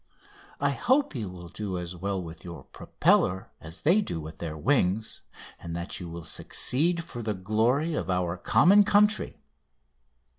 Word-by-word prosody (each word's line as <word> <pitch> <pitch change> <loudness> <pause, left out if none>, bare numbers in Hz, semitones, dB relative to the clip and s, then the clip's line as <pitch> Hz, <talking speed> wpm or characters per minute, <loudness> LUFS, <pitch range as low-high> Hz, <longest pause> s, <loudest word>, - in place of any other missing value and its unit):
I - - +2
hope 270 - +1
you 110 -8 -4
will 90 -1 -10
do 100 -1 -4
as 90 0 -6
well 95 +2 -2
with 80 -2 -9
your 85 -1 -9
propeller 95 +1 0
as 80 +3 -9
they 180 +8 +4
do 85 - -4
with 80 +1 -9
their 80 -2 -5
wings, 110 - 0 0.4
and 85 -1 -6
that 85 +1 -5
you 90 -2 -7
will 85 0 -8
succeed 170 - 0
for 130 -8 -8
the 110 -2 -2
glory 115 - +1
of 95 - -3
our 90 -1 0
common 190 - +5
country." 210 +1 +3
95 Hz, 160 wpm, -27 LUFS, 85-145 Hz, 0.4 s, common